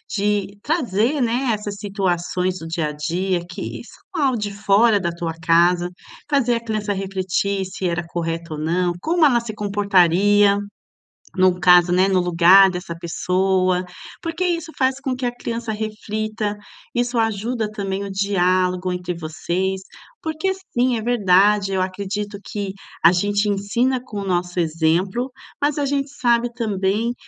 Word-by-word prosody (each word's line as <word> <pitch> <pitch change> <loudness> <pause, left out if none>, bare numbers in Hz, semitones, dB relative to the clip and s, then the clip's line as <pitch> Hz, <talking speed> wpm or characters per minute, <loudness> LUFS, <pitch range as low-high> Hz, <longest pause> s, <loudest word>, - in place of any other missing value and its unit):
de 205 -1 -1
trazer, 265 - 0
né, 245 +1 0
essas 210 -1 -4
situações 185 -2 -1
do 165 - -8
dia 165 -2 -1
a - - -4
dia 175 +4 -1
que 175 - -6
isso - - -14 0.2
não 330 - -1
é - - +3
algo 255 -3 0
de 205 -1 -3
fora 205 +2 +3
da 170 - -1
tua 170 -1 -4
casa, 175 +2 +3 0.4
fazer 275 -4 +2
a 230 - -3
criança 215 -2 -2
refletir 195 0 -1
se 185 0 -4
era 170 0 -2
correto 165 -1 -4
ou 150 - -5
não, 175 +3 0
como 330 - +3
ela 250 -5 +4
se 230 -2 -6
comportaria 200 0 +3 0.7
no 185 -1 +3
caso, 180 0 +6
né, 185 +2 +3
no 190 -1 +3
lugar 180 +2 +6
dessa 180 -1 -5
pessoa. 185 +2 0 0.4
Porque 335 +2 -3
isso 335 -2 -1
faz 265 0 +1
com 265 -3 -2
que 255 0 -4
a 240 - -1
criança 235 -1 -4
reflita, 215 0 -3 0.4
isso 240 0 0
ajuda 225 0 -1
também 200 -2 -3
o 200 - -5
diálogo 185 -2 +1
entre 180 0 -3
vocês. 175 +4 -2 0.4
Porque 320 +4 -1 0.2
sim, 245 0 +2
é - - -3
verdade, 205 -3 +3
eu 190 -1 0
acredito 200 +2 -3
que 200 -2 -4 0.3
a 165 +2 +7
gente 205 +3 +1
ensina 235 +6 0
com 210 -5 -6
o 200 - -4
nosso 180 0 -1
exemplo, 170 +9 0 0.3
mas 290 0 +1
a 285 - 0
gente 275 0 -1
sabe 240 -3 +1
também 215 0 -1
200 Hz, 160 wpm, -21 LUFS, 180-230 Hz, 0.7 s, a